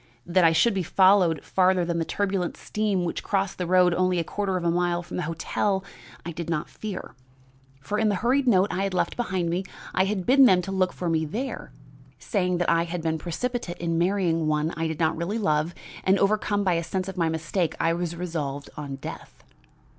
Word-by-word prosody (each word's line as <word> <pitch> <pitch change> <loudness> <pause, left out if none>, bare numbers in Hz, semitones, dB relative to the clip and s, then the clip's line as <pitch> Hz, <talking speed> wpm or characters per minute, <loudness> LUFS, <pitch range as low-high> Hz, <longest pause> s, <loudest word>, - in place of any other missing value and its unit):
"That 175 +1 +3
I 165 - +6
should 215 +8 +3
be 195 - 0
followed 185 -2 +4
farther 185 -1 +2
than 170 0 -1
the 165 - -1
turbulent 195 -2 -1
stream 205 -4 -1
which 170 - -3
crossed 195 -2 -1
the 180 - -2
road 180 0 +4
only 185 0 +1
a 170 - +1
quarter 195 +2 -2
of 175 - -4
a 170 - +2
mile 175 0 0
from - - -7
the - - -1
hotel, 190 +4 -1 0.4
I 170 - -4
did 170 0 -6
not 155 -3 -2
fear. 210 -4 -6 0.7
For 205 +10 -2
in 220 -1 +3
the 205 - +1
hurried 255 +7 +1
note 195 -4 +4
I 190 - -1
had 195 -1 -1
left - - 0
behind 185 -8 -1
me, 180 +3 -1 0.3
I 190 - +3
had 195 -2 -2
bidden 270 +2 +6
them 185 -6 +5
to 195 - -5
look 190 -1 +1
for 180 - -5
me 160 -1 +1
there, 240 - -5 0.5
saying 180 -4 -1
that 175 - 0
I 165 0 +2
had 170 -1 -5
been 160 -1 -1
precipitate 190 +3 -3
in 165 -1 -1
marrying 175 -3 +1
one 155 +1 0
I 165 +1 -1
did 160 -1 -4
not 160 -1 +2
really 170 +7 -2
love, 155 -4 0 0.3
and, 190 +1 +4
overcome 205 0 +1
by 185 -2 +2
a 170 0 0
sense 185 +2 -3
of 190 - -6
my 165 -3 +1
mistake, 165 +2 -1
I 165 - +2
was 170 0 -3
resolved 150 -5 -4
on 145 -2 -5
death. 135 - -9
180 Hz, 220 wpm, -25 LUFS, 165-195 Hz, 0.7 s, I